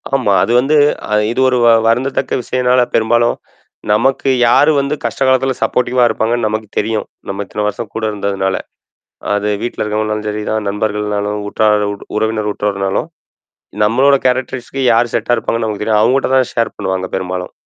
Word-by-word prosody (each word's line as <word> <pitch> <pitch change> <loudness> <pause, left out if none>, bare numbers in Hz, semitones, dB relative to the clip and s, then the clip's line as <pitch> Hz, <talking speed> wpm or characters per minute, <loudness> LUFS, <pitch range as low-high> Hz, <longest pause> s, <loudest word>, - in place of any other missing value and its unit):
ஆமா. 120 -7 +1
அது - - -1
வந்து 140 +5 +1 0.3
அ - - -8 0.2
இது 125 - -3
ஒரு 125 -1 +2
வ - - +5 0.2
வருந்தத்தக்க 130 +4 0
விஷயம்னால, 125 +1 +1
பெரும்பாலும் 120 +1 +2 0.6
நமக்கு 130 +5 +1 0.2
யாரு 145 +6 +5
வந்து 140 +2 -1
கஷ்ட 115 +2 -4
காலத்துல 130 0 +2
சப்போர்ட்டிவா 125 0 +1
இருப்பாங்கன்னு 115 0 0
நமக்கு 110 0 -3
தெரியும். 110 0 -1 0.2
நம்ம 100 +1 -3
இத்தன 105 +1 -4
வருஷம் 105 +1 -5
கூட 115 - -3
இருந்ததுனால. 100 -2 -2 0.8
அது 105 0 -1
வீட்ல 120 - -4
இருக்கவங்கனாலும் 105 0 -2
சரிதான், 105 0 -3
நண்பர்கள்னாலும், 105 0 -2
உற்றார் 105 -1 +2 0.3
உறவினர் 110 -1 -1
உற்றார்னாலும், 100 -2 -2 0.7
நம்மளோட 130 +6 +4
கேரக்டரிஸ்க்கு 130 +1 -2
யார் 115 +1 +2
செட்டா 120 - +1
இருப்பாங்கன்னு 115 -1 -2
நமக்கு 105 -1 -3
தெரியும். 105 -1 +2
அவங்கட்ட 130 +5 +2
தான 130 -2 +3
ஷேர் 115 -1 -1
பண்ணுவாங்க 95 -2 -2
பெரும்பாலும். 90 -1 -4
110 Hz, 150 wpm, -15 LUFS, 105-125 Hz, 0.8 s, வ